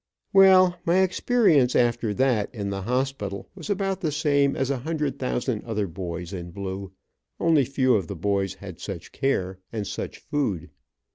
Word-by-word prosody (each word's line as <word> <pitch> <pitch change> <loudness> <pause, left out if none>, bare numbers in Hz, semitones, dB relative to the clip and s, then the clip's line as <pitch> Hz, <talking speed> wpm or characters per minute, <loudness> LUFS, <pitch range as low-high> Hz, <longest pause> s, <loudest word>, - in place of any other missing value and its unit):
Well, 185 -2 +6
my 180 +2 +3
experience 185 - +3
after 120 -2 +2
that, 125 -6 +2
in 100 -2 -3
the 100 0 -3
hospital, 125 -3 -2
was 185 -2 -9
about 195 -1 -1
the 160 -5 0
same 145 -2 +2
as 135 +1 0
a 135 - -1
hundred 150 -1 -2
thousand 125 -3 -1
other 110 -3 -1
boys 90 0 -6
in 90 -2 -6
blue, 95 +1 -6 0.5
only 155 -5 +4
few 130 -1 +2
of 95 -6 +1
the 100 - -5
boys 95 +1 -1
had 95 -4 -10
such 90 -5 -7
care, 95 -9 -1
and 110 -3 -3
such - - -5
food. 100 - -2
125 Hz, 165 wpm, -25 LUFS, 100-150 Hz, 0.5 s, Well